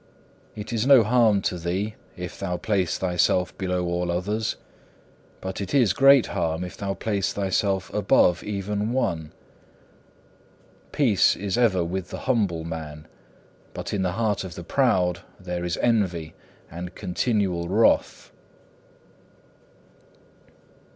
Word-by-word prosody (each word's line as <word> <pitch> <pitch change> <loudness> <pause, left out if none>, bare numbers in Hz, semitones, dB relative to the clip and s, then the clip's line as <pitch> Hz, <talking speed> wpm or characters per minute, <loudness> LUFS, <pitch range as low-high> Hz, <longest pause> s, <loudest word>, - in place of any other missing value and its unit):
It 105 +2 -6
is 115 +2 0
no 135 -5 +8
harm 110 -3 +3
to 90 - -1
thee 95 +6 -2 0.2
if 90 0 -7
thou 90 -2 -2
place 95 -6 0
thyself 90 -1 +1
below 90 -2 -2
all 85 0 -1
others; 105 +6 -1 0.9
but 95 +1 -5
it 100 - -3
is 120 -9 +4
great 135 +2 +6
harm 85 -3 -1
if 90 - -7
thou 100 -1 -3
place 100 -3 -1
thyself 95 -1 -1
above 90 -3 +3
even 105 +2 -2
one. 80 -11 -1 1.6
Peace 120 -10 +3
is 100 0 -3
ever 110 -7 +3
with 90 +2 -4
the - - -7
humble 100 -10 +1
man, 80 -2 -7 0.7
but - - -5
in 100 - 0
the 90 -1 0
heart 105 -1 0
of 90 -4 -8
the 85 - -7
proud 90 -6 +1 0.2
there 90 -2 -4
is 90 0 -2
envy 90 -9 0 0.4
and 90 +2 -7
continual 90 -3 -1
wrath. 110 +4 +2
95 Hz, 130 wpm, -24 LUFS, 90-105 Hz, 1.6 s, no